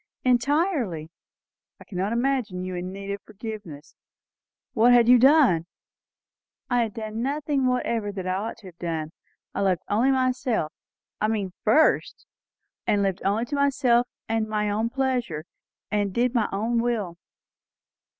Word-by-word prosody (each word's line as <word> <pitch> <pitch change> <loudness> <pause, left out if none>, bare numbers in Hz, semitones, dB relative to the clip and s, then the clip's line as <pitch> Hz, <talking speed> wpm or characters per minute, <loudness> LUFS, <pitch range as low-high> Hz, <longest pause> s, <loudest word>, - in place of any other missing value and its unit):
"Entirely." 250 - +1 0.7
"I - - -12
cannot 195 +2 -3
imagine 235 -6 0
you 185 0 -4
in 180 +1 -4
need 200 +1 -6
of 200 - -4
forgiveness. 210 -8 -9 0.8
What 240 +2 +5
had 240 -1 +6
you 250 0 +7
done?" 260 - +5 1.0
"I 245 0 +3
had 220 -3 -2
done 220 0 -4
nothing 280 0 0
whatever 235 -4 0
that 190 -2 -6
I 185 - 0
ought 210 +5 -3
to 225 - -17
have 180 -2 -12
done. 160 -3 -3 0.4
I - - -2
loved 190 -3 +1
only 230 +6 +3
myself, 255 - 0 0.5
I 215 - +3
mean 205 -4 -2
first, 270 +9 +3 0.6
and 205 -1 +2
lived 195 -1 -1
only 210 +4 +1
to 285 - -4
myself 255 -4 +3 0.2
and 225 -1 -1
my 210 -1 0
own 220 +3 0
pleasure, 245 - -1 0.5
and 205 -2 0
did 240 +4 +1
my 230 -4 +1
own 230 +4 0
will." 215 -8 -2
220 Hz, 150 wpm, -25 LUFS, 195-250 Hz, 1.0 s, you